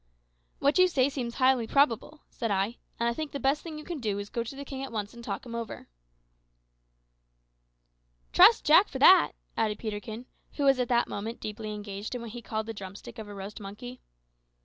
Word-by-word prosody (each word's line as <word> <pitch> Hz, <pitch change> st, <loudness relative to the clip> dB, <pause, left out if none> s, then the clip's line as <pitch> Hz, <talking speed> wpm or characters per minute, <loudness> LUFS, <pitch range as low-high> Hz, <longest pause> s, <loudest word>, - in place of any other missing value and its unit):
"What 285 Hz, +6 st, +2 dB
you 370 Hz, -, +7 dB
say 275 Hz, -6 st, +2 dB
seems 240 Hz, -4 st, -4 dB
highly 255 Hz, -3 st, +3 dB
probable," 280 Hz, +3 st, +1 dB
said 230 Hz, -, -3 dB
I; 200 Hz, +4 st, 0 dB, 0.2 s
"and 235 Hz, -, +1 dB
I 235 Hz, -, +1 dB
think 310 Hz, +4 st, -5 dB
the 280 Hz, -, -3 dB
best 275 Hz, +3 st, +1 dB
thing 320 Hz, -2 st, -7 dB
you 305 Hz, -, -8 dB
can 340 Hz, -2 st, -5 dB
do 210 Hz, -5 st, -1 dB
is 205 Hz, 0 st, -5 dB
to -, -, -38 dB
go 235 Hz, -, -1 dB
to 235 Hz, +4 st, -8 dB
the 280 Hz, +1 st, -7 dB
king 270 Hz, 0 st, -6 dB
at 270 Hz, -, -6 dB
once 210 Hz, -2 st, -4 dB
and 235 Hz, 0 st, -11 dB
talk -, -, -4 dB
him 235 Hz, -, -8 dB
over." 230 Hz, -2 st, -6 dB, 2.4 s
"Trust -, -, +7 dB
Jack -, -, +7 dB
for -, -, -6 dB
that," -, -, +7 dB, 0.2 s
added 215 Hz, -2 st, 0 dB
Peterkin, 220 Hz, +2 st, -6 dB, 0.3 s
who 290 Hz, -, -2 dB
was 270 Hz, -2 st, +4 dB
at 250 Hz, -, +1 dB
that 240 Hz, 0 st, +2 dB
moment 220 Hz, +4 st, -5 dB
deeply 215 Hz, 0 st, -5 dB
engaged 205 Hz, +2 st, -6 dB
with 245 Hz, -, -4 dB
what 230 Hz, -, -7 dB
he 240 Hz, +1 st, -7 dB
called 220 Hz, -1 st, -3 dB
the 225 Hz, -, -5 dB
drumstick 200 Hz, +3 st, -9 dB
of 215 Hz, -, -7 dB
a 205 Hz, -, -9 dB
roast 200 Hz, +2 st, -7 dB
monkey. 230 Hz, +5 st, -9 dB
235 Hz, 215 wpm, -28 LUFS, 210-265 Hz, 2.4 s, you